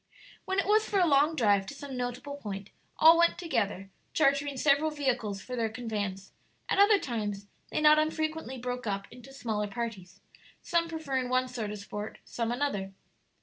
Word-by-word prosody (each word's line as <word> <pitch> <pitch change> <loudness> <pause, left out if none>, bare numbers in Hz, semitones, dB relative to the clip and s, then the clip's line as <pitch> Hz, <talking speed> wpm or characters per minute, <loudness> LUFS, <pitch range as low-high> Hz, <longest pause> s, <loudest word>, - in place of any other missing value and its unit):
When 380 - -1
it 395 - +2
was 430 +2 +3
for 405 - +1
a 360 - +5
long 300 +1 +4
drive 205 -7 +3
to 280 - -7
some 280 -2 -7
notable 250 +3 -4
point, 200 -6 -7 0.3
all 325 +1 +8
went 340 0 +4
together, 215 - -2 0.2
chartering 280 -1 +2
several 290 +3 +3
vehicles 245 -9 -2
for 250 - -5
their 230 -2 0
conveyance; 205 -4 -4 0.3
at - - +1
other 405 +1 +7
times 210 - -3 0.2
they - - -1
not 305 0 +7
unfrequently 310 -3 -2
broke 250 -1 -4
up 195 -1 -2
into 250 +2 -13
smaller 220 -6 -2
parties, 200 -4 -6 0.4
some 335 -1 +1
preferring 275 -6 -2
one 255 0 +2
sort 235 -4 -4
of 210 - -5
sport, 205 +1 -6
some 230 -1 -2
another. 220 -7 -2
250 Hz, 175 wpm, -29 LUFS, 210-305 Hz, 0.4 s, all